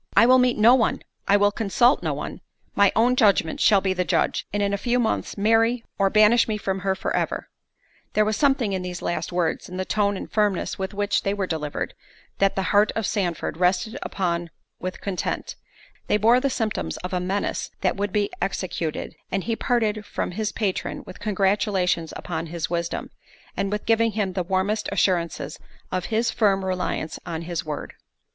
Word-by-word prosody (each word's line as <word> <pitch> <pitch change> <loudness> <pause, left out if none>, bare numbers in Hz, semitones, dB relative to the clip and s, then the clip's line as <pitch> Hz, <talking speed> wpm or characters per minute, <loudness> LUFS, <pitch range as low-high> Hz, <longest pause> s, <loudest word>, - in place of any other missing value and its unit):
"I 215 - +8
will 255 +1 +6
meet 250 -1 +3
no 225 +3 +7
one—I 225 -4 +1
will 205 0 +4
consult 235 +5 +3
no - - -1
one—my 200 -1 -1
own 245 +3 +4
judgment 200 -9 +3
shall 200 -3 +5
be 190 -1 +1
the 180 0 0
judge, 170 -3 0
and 205 0 0
in 200 0 0
a - - +1
few 245 +2 +1
months 225 -3 -1
marry, 225 +3 +3 0.2
or—banish 215 +4 +5
me 215 -1 -1
from 195 -2 -2
her 190 0 0
for - - -2
ever." - - -2 0.6
There 215 - +3
was 215 0 0
something 270 -7 +2
in 190 - -1
these 180 -1 -6
last 175 - -2
words, 175 -1 -1
in 180 - -6
the 185 - -2
tone 205 -1 +1
and - - -6
firmness 210 -4 0
with 190 +1 -4
which 205 0 +1
they 200 +1 -1
were 200 -2 -1
delivered, 155 -4 -3 0.5
that 195 0 +3
the 195 - 0
heart 205 +1 +5
of 225 - -1
Sandford 175 -7 -2
rested 180 +5 +1
upon 175 -3 -2 0.3
with 185 0 -5
content—they 200 +2 -4
bore 230 +4 +5
the 275 +2 0
symptoms 215 - -2
of 180 - -5
a 180 - +1
menace 190 +3 -2
that 185 - +1
would 200 0 -2
be 205 0 0
executed; 175 -5 -3 0.2
and 195 -1 -1
he 230 - -1
parted 220 -3 0
from - - -3
his 215 +3 -2
patron 205 -5 -2
with 185 - -11
congratulations 195 -4 +1
upon 165 -1 -4
his 165 0 -4
wisdom, 170 -1 -2 0.4
and 195 0 -1
with 210 0 -3
giving 225 0 +3
him 200 -3 -1
the 185 - -1
warmest 190 +4 0
assurances 175 -4 0 0.3
of 185 -1 -1
his 225 +1 0
firm 195 -4 +2
reliance 185 -3 -2
on 165 -1 -5
his 170 0 -3
word. 150 -2 -5
200 Hz, 185 wpm, -24 LUFS, 180-215 Hz, 0.6 s, I